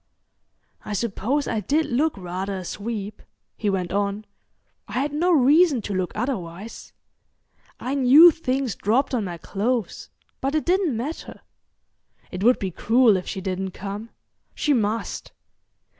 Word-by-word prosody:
"I 210 - -5
suppose 235 +6 -1
I 225 - -1
did 295 - +1
look 290 +4 0
rather 185 +2 -4
a 185 - -7
sweep," 210 +1 -5 0.3
he 210 - -1
went 185 -3 -1
on. 200 +1 -1 0.6
"I - - -10
had 280 +3 -1
no 345 +5 +2
reason 300 0 +5
to 205 - -4
look 185 -1 -1
otherwise. 210 -4 -5 0.9
I 260 - -3
knew 285 +6 +8
things 270 -7 -2
dropped 245 +10 0
on 235 -4 +1
my 175 -2 -5
clothes, 210 +4 -2 0.3
but 275 +3 -1
it 310 - 0
didn't 355 - +1
matter. 285 +8 -6 0.9
It 185 +1 -4
would 245 +3 +5
be 190 -2 -3
cruel 230 +4 +4
if 180 - -3
she 190 - -4
didn't 190 0 -3
come. 205 +3 -6 0.5
She 295 - +1
must. 225 -2 -2
225 Hz, 145 wpm, -24 LUFS, 195-275 Hz, 0.9 s, knew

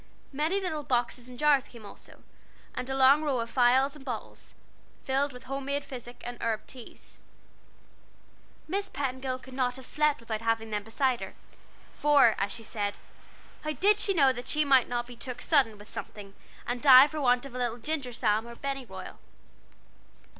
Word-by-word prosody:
Many 310 +8 0
little 340 -6 -3
boxes 245 -2 -1
and 250 - -11
jars 290 -2 +3
came 230 -3 -13
also, 200 - -14 0.5
and 250 - -5
a 265 - -1
long 270 +3 +6
row 285 -5 0
of 230 0 -4
phials 260 +3 +3
and 295 - -13
bottles, 245 -5 -7 0.5
filled 275 +2 0
with 250 -1 -12
homemade 275 +2 -3
physic 245 -2 -9
and 245 0 -7
herb 225 -2 -2
teas. 250 -3 -13 1.5
Miss 395 +4 -1
Petingill 260 -3 -3
could 260 0 -14
not 250 -1 0
have 260 -1 -10
slept 300 -1 +1
without 225 -2 -5
having 225 -1 -1
them 210 -1 -1
beside 245 +3 0
her, - - -8 0.6
for, 290 -6 +5
as 200 +1 -1
she 230 - -6
said, 205 -2 -3 0.7
how 305 0 -2
did 410 +7 +3
she 395 -2 +2
know 275 -5 +5
that 245 +1 -8
she 305 +2 +2
might 265 -3 +4
not 240 0 -2
be 245 0 -11
"took 250 +1 -6
sudden" 260 -9 +2
with 205 +1 -14
something, 200 -3 -7 0.3
and 245 0 -3
die 265 -2 +9
for 300 0 -5
want 245 -1 +2
of 275 - -10
a 250 - -5
little 240 -1 -1
ginger 280 +1 -3
balsam 225 -2 0
or 235 - -9
pennyroyal? 275 -1 -6
255 Hz, 180 wpm, -28 LUFS, 235-280 Hz, 1.5 s, die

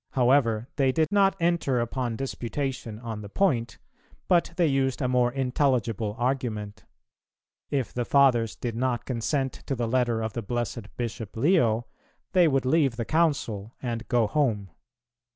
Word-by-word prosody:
However, 120 -3 +3
they 135 -2 +3
did 155 +3 +1
not 195 -1 +4
enter 165 -7 +1
upon 120 0 -2
disputation 130 -2 -4
on 115 -3 -5
the 100 - -8
point, 120 - 0 0.5
but 175 -2 +3
they 175 - +4
used 135 -3 +1
a 130 - 0
more 125 -1 +2
intelligible 125 -5 0
argument: 120 -5 -2 0.8
If 135 -4 -1
the 125 - -1
Fathers 120 -4 +3
did 120 -2 -4
not 125 0 -1
consent 130 +2 -1
to 135 - -1
the 120 -2 -1
letter 120 -2 +1
of 110 -1 -3
the 120 - -3
blessed 120 -1 -4
Bishop 115 -3 -5
Leo, 120 - +3 0.5
they 180 -3 +5
would 135 -3 +1
leave 140 -3 +2
the 115 -1 -3
Council 135 -10 0
and 120 -2 -4
go 120 -3 +3
home. 105 - 0
125 Hz, 150 wpm, -26 LUFS, 115-140 Hz, 0.8 s, they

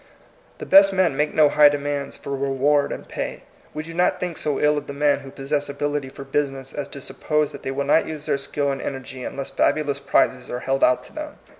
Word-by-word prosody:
The - - -7
best 195 +1 +7
men 185 -6 +2
make 150 +2 +1
no 155 -1 +5
high 150 0 +6
demands 145 -1 -3
for 140 - -8
reward 140 +1 +1
and - - -6
pay. - - -5 0.3
We 155 - -5
do 165 +1 -9
not 175 +2 +2
think 180 -2 -3
so 150 -3 -1
ill 150 0 +3
of 145 - -14
the 140 - -5
men 145 0 +2
who 135 -1 -10
pos 135 0 -10
sess 145 -1 0
ability 145 -1 -2
for 135 - -9
business 135 -1 -2
as 145 -1 -4
to 140 - -9
suppose 150 +3 -1
that - - -9
they - - -4
will 140 +1 -2
not 150 +3 +3
use 150 -2 -6
their 140 - 0
skill 140 +1 -1
and 135 - -4
energy 130 -1 -6
unless 135 +2 -5
fabulous 145 -2 +1
prizes 125 -2 +1
are 125 - -4
held 135 +1 0
out 125 - +4
to - - -15
them. - - -6
140 Hz, 240 wpm, -23 LUFS, 135-150 Hz, 0.3 s, best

